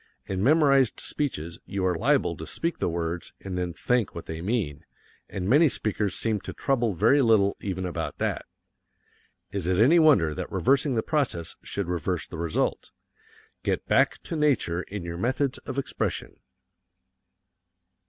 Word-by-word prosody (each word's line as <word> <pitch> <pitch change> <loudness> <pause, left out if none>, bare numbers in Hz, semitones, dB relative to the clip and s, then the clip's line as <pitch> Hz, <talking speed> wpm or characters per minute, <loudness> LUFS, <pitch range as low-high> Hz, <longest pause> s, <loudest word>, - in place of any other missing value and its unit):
In 95 -1 -3
memorized 140 -3 +4
speeches 85 - -3
you 95 -2 -2
are 90 - +2
liable 80 - +2
to - - -7
speak 170 +1 -2
the - - 0
words, 85 +1 -3
and 95 -2 -6
then 90 -1 -2
think 120 +5 0
what 85 - -6
they 80 0 -6
mean 90 -8 -2 0.5
and 95 -1 -4
many 150 +7 +5
speakers 105 -5 -1
seem 110 -2 -1
to - - -7
trouble 120 -7 0
very 115 - +4
little 110 -5 +4
even 95 -2 -3
about 90 - -4
that. - - -2 1.0
Is 95 -4 -3
it 90 -1 +2
any 135 - +6
wonder 135 - +5
that - - -5
reversing 135 +1 +2
the 110 - +1
process 135 - -1
should 100 -3 -4
reverse 90 0 -1
the 80 - -8
result? 85 -2 -1 0.7
Get - - -1
back - - +3
to - - -5
nature 135 - +1
in 100 0 -7
your 85 0 -5
methods 130 +6 0
of 130 - -4
expression. 140 - -3
100 Hz, 160 wpm, -26 LUFS, 85-135 Hz, 1.0 s, any